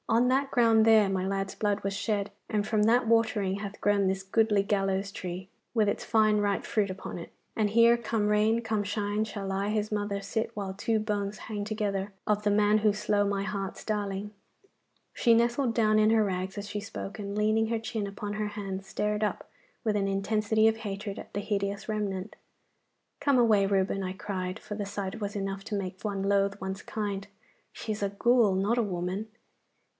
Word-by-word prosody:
On 235 +2 +4
that 270 +2 +2
ground 225 -3 +5
there 220 -2 +6
my 190 -1 -1
lad's 195 0 -2
blood 205 -1 0
was 195 0 -1
shed, 205 0 -1 0.2
and 210 -1 0
from 215 -2 +2
that 235 +2 +4
watering 220 -4 +2
hath 200 0 -6
grown 205 -1 +2
this 190 0 -1
goodly 210 +1 +3
gallows 195 -1 0
tree 185 0 -6 0.3
with 215 -2 +3
its 205 - -1
fine 215 -2 +3
ripe 205 -1 0
fruit 205 -3 +1
upon 185 -1 -6
it. 170 - -9 0.2
And 215 -2 +2
here, 230 +2 +6
come 225 -2 -1
rain, 215 +2 +3
come 220 -2 -1
shine, 205 +1 -1
shall 200 -2 -4
I, 200 +1 -1
his 215 0 -1
mother, 205 -1 -1
sit 210 +3 -2
while 195 -2 -4
two 220 +3 0
bones 210 -1 -2
hang 210 -2 -5
together 205 -2 -2 0.2
of 210 0 +1
the 210 - +2
man 210 +1 +4
who 215 0 +4
slow 205 0 +1
my 200 -1 0
heart's 200 -2 -4
darling.' 205 -1 -2 0.8
She 235 - +4
nestled 235 +2 +2
down 215 -2 +3
in 215 0 +5
her 220 -1 +4
rags 185 0 -3
as 205 0 -4
she 210 0 -4
spoke, 200 -1 -6
and 200 -1 -5
leaning 215 +1 +2
her 230 0 -1
chin 220 -2 -3
upon 205 +1 -5
her 210 0 -2
hands 195 -2 -5
stared 210 +2 -1
up 210 - -2 0.4
with 215 -2 +2
an 200 -1 +1
intensity 215 +2 +2
of 225 0 +2
hatred 205 -2 -5
at - - -10
the 205 - -1
hideous 200 -1 -2
remnant. 205 -2 -3 0.9
'Come 280 -3 +3
away, 220 -5 +5
Reuben,' 195 0 +1
I 185 0 -3
cried, 190 -1 -4
for - - -7
the 205 -1 -3
sight 200 +1 -5
was 205 0 -3
enough 195 0 -3
to 220 - -3
make 190 -2 -4
one 200 -2 -2
loathe 200 0 +1
one's 190 0 -4
kind. 200 -2 -4 0.4
'She 220 - -5
is 210 - -4
a 200 - +1
ghoul, 220 0 +3
not 205 +6 +1
a - - +3
woman. 185 +2 -3
205 Hz, 200 wpm, -29 LUFS, 195-215 Hz, 0.9 s, there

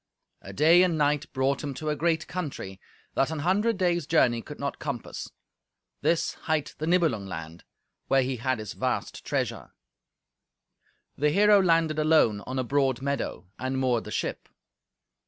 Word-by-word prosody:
A 95 - -9
day 160 - +5
and 180 -3 +3
a - - -2
night 145 -1 +1
brought 135 +2 0
him 140 -2 -4
to 155 +3 -4
a 150 - 0
great 160 +1 0
country 140 - -6 0.3
that 135 - +1
an 160 - -3
hundred 195 +8 +1
days' 175 -4 +1
journey 120 -8 +3
could 150 +5 -10
not 140 0 -3
compass; 140 -6 -5 0.7
this 170 - +1 0.2
hight 155 -2 0
the 155 - -2
Nibelung 165 - +2
land, 85 -2 -8 0.4
where 135 -1 +3
he 130 0 -2
had 130 +2 0
his 110 -2 -6
vast - - -3
treasure. - - -3 1.4
The 150 +1 +2
hero 205 +4 +5
landed 165 -3 +2
alone 155 -10 +3
on 130 +1 -3
a 130 - +1
broad 135 0 0
meadow, 140 -8 -3
and 130 +2 -2
moored 125 -3 +1
the - - -7
ship. - - -3
145 Hz, 165 wpm, -27 LUFS, 130-165 Hz, 1.4 s, day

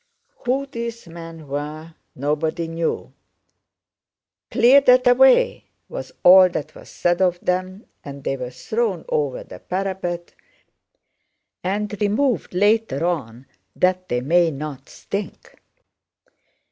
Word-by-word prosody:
Who 270 +3 +1
these 235 -5 -6
men 165 -2 -10
were 150 +3 -5 0.2
nobody 155 +4 -1
knew. 165 0 -3 1.4
"Clear 265 +4 +6
that 250 -1 +5
away!" 265 - +5 0.2
was - - -7
all 185 +1 +8
that 155 -3 -5
was - - -14
said 175 +1 0
of 180 -1 +2
them, 185 +3 -2 0.2
and 140 -1 -9
they 135 - -1
were 125 -2 -5
thrown 195 - -2
over 145 -4 -1
the 90 - -12
parapet 180 -2 -4 1.3
and 205 +2 -2
removed 215 0 0
later 205 -6 +2
on 130 -8 -3 0.3
that 185 0 +1
they 125 0 0
might 165 +3 +2
not 140 -2 -7
stink. 200 +1 -6
175 Hz, 115 wpm, -22 LUFS, 150-210 Hz, 1.4 s, all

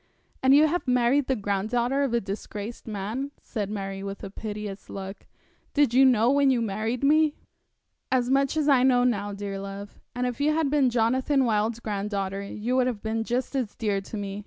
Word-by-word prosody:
'And 265 +1 +6
you 300 +2 +7
have 330 0 -1
married 250 +2 +3
the 265 - +1
granddaughter 230 +6 0
of 275 -3 0
a 235 - +2
disgraced 205 +3 -6
man,' 220 +6 -3
said 210 -5 -4
Mary, 195 -2 -4
with 195 0 -6
a 195 - -6
piteous 210 -1 -6
look. 195 0 -8 0.5
'Did 285 -5 +3
you 265 +2 +6
know 240 -1 +4
when 280 -1 +4
you 255 -2 +3
married 225 +3 -2
me?' 305 +1 +4 0.8
'As 250 -2 +2
much 275 +3 +2
as 305 -2 +1
I 275 -4 +5
know 250 -1 +4
now, 205 -5 0
dear 200 -1 -5
love. 200 +1 -8 0.2
If 250 +1 -2
you 305 +1 +2
had 315 -4 +1
been 285 -4 +3
Jonathan 255 +4 +2
Wild's 220 0 0
granddaughter 200 -2 -3
you 215 +5 -3
would 255 -1 +3
have 230 -5 -3
been 225 0 -1
just 245 +4 -2
as 250 -6 -2
dear 205 -3 -1
to 205 +3 -7
me. 200 0 -4
230 Hz, 195 wpm, -26 LUFS, 205-265 Hz, 0.8 s, you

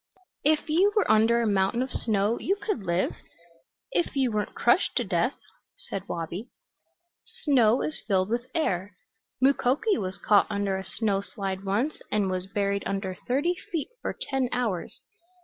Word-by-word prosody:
"If 305 +2 +2
you 355 +7 +4
were 425 - +3
under 225 +2 +4
a - - +1
mountain 200 +4 +2
of 260 - -6
snow 215 +1 0
you 390 - +1
could 405 - -3
live, 170 +2 0 0.7
if 175 +9 0
you 265 -3 +2
weren't 210 -1 -2
crushed - - +3
to - - +2
death," - - 0 0.4
said 195 - -6
Wabi. 170 +7 -4 0.9
"Snow 250 -5 +4
is 310 - -2
filled 190 -2 +2
with 240 +2 -1
air. 195 - -1 0.4
Mukoki 275 - +2
was 185 -1 -3
caught 205 -1 +4
under 200 -2 0
a 190 - -3
snow 195 0 0
slide 195 -2 -4
once 220 +10 0
and 205 -3 +1
was 185 0 -2
buried 200 0 0
under 195 -1 -2
thirty 285 +8 +2 0.2
feet 330 -4 -2
for - - -4
ten 265 -2 0
hours. 225 -8 -2
215 Hz, 160 wpm, -27 LUFS, 195-265 Hz, 0.9 s, you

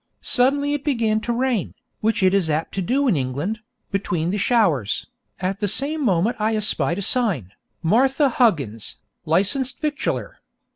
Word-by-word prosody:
Suddenly 280 +3 +3
it 290 -1 -3
began 230 -7 +1
to 240 - -3
rain, 240 -4 -1 0.2
which 220 -2 0
it 185 0 +4
is 190 -5 +1
apt 155 +2 -2
to 195 - -2
do 270 +10 +1
in 220 - +3
England, 145 +11 -3 0.3
between 175 -4 -1
the 205 - -2
showers, 170 - +1 0.3
and 185 - -1
at 195 - -9
the 205 - 0
same 285 +9 0
moment 200 0 +1
I 220 +1 0
espied 175 -7 0
a 200 - -3
sign, 185 - +3 0.3
'Martha 265 - +3
Huggins, 145 - 0 0.3
Licensed 200 - +1
Victualler.' 300 -1 -3
210 Hz, 160 wpm, -22 LUFS, 170-255 Hz, 0.3 s, it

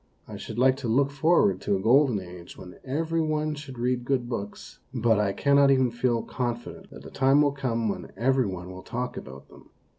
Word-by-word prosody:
I - - -8
should 110 - -8
like 130 +1 +4
to 135 -3 -5
look 135 +5 +2
for 160 +5 +3
ward 95 -1 +1
to 100 - 0
a - - -1
jgolden 115 -3 +3
age 90 -1 -12
when 90 - -12
every 165 +5 -1
one 155 -1 -1
should 140 -3 -9
read 125 +1 -1
good 125 -1 -1
books, 105 -4 -7
but 115 -4 +2
I 105 -2 +1
cannot 140 +5 +3
even 130 -3 +3
feel 120 -1 0
con 120 -2 -3
fident - - -12
that - - -13
a - - -10
time 135 +2 +3
will 145 - +2
come 120 -5 -2
when 100 - -4
every 130 +1 +2
one 90 -1 -6
will 95 0 -9
talk 125 +5 -4
about 65 +1 -10
them. - - -17
125 Hz, 220 wpm, -26 LUFS, 110-140 Hz, -, like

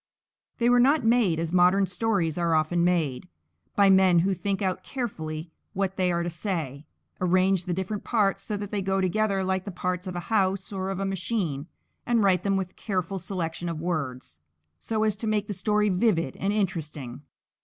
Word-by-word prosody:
They 235 - +2
were 245 0 +5
not 275 +3 +4
made 225 -8 +3
as 165 +1 -3
modern 185 +2 +5
stories 185 -4 0
are 170 -2 +1
often 160 +2 +2
made, 165 -7 0 0.5
by 200 -1 +5
men 190 -2 +5
who 195 +3 +1
think 195 +1 -2
out 185 -2 -1
carefully 160 - -5 0.2
what 195 0 -1
they 185 -1 +1
are 170 0 0
to 175 - -2
say, 160 -6 -4 0.3
arrange 185 0 +2
the 180 - -1
different 190 +3 -3
parts 210 -5 +1
so 210 - -3
that 205 0 -6
they 205 - -1
go 195 0 0
together 195 +1 +1
like 190 0 0
the 200 - -6
parts 180 0 -3
of 185 - -5
a - - -2
house 195 -2 +1
or 190 0 -3
of 195 -1 -3
a 195 - -1
machine, 185 -6 -2 0.4
and 235 -2 +2
write 185 -3 +3
them 195 0 +1
with 190 -1 -4
careful 195 -1 -2
selection 170 -2 -3
of 165 -2 -4
words 130 - -4 0.4
so 220 -1 -1
as 215 -2 +2
to 220 - -3
make 215 -1 +1
the 205 - -3
story 210 +2 +1
vivid 180 - +1
and 195 - 0
interesting. 155 - -3
190 Hz, 195 wpm, -26 LUFS, 170-200 Hz, 0.5 s, were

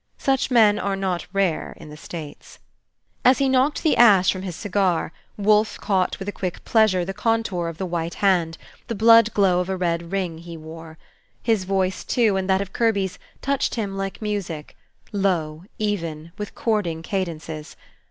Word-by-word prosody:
Such 270 -1 +1
men 215 -4 +5
are 200 -1 -1
not 190 -3 -2
rare 195 -5 -1
in - - -11
the - - -9
States. 155 -1 -9 0.7
As 255 +1 +6
he 275 - +2
knocked 265 +3 +2
the 315 - +3
ashes 200 -6 +6
from 185 - -5
his 185 -3 -5
cigar, 185 -5 0 0.2
Wolfe 210 +1 +3
caught 190 -3 0
with 195 - -7
a - - -1
quick 185 -3 -5
pleasure 215 -6 +3
the 195 - -4
contour 210 -5 0
of 165 -1 -6
the 190 - -3
white 170 -1 -3
hand, 175 -5 +1 0.3
the 230 - -3
blood 230 +1 +6
glow 190 -3 +3
of 180 +1 -2
a 190 - -1
red 170 -1 -2
ring 180 -5 -2
he 170 0 -9
wore. 160 0 -10 0.5
His 220 -5 +1
voice, 190 -1 0
too, 225 -5 +2
and 190 0 -2
that 190 0 +3
of 195 -1 -6
Kirby's, 200 -5 0 0.2
touched 280 -1 0
him 205 -4 -3
like 195 +2 -4
music, 190 -8 -4 0.4
low, 175 -5 -1
even, 170 -7 -3
with 210 -1 -7
chording 185 -8 -1
cadences. 160 -5 -4
190 Hz, 175 wpm, -23 LUFS, 170-210 Hz, 0.7 s, As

